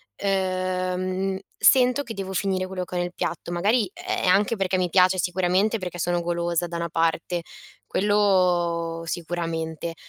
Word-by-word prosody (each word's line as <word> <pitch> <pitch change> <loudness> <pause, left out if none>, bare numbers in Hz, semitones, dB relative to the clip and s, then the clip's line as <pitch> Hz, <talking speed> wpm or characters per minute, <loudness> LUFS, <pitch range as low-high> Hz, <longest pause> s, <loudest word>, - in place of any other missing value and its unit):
ehm, 185 0 -1 0.2
sento 255 +2 +4
che 230 - -7
devo 190 -1 -5
finire 185 -1 0
quello 185 -1 -4
che 180 - -8
ho - - 0
nel 175 0 -2
piatto. 170 +1 -4
Magari 205 +4 +2
è - - -3
anche 205 +5 +3
perché 190 -1 0
mi 180 -1 0
piace, 185 +1 +4
sicuramente, 185 +5 +1
perché 180 -1 -5
sono 175 +1 0
golosa, 170 0 -1
da 170 0 -5
una 170 0 -3
parte, 165 +1 0 0.5
quello 180 -5 +1
sicuramente. 165 -1 -3
180 Hz, 150 wpm, -24 LUFS, 170-190 Hz, 0.5 s, sento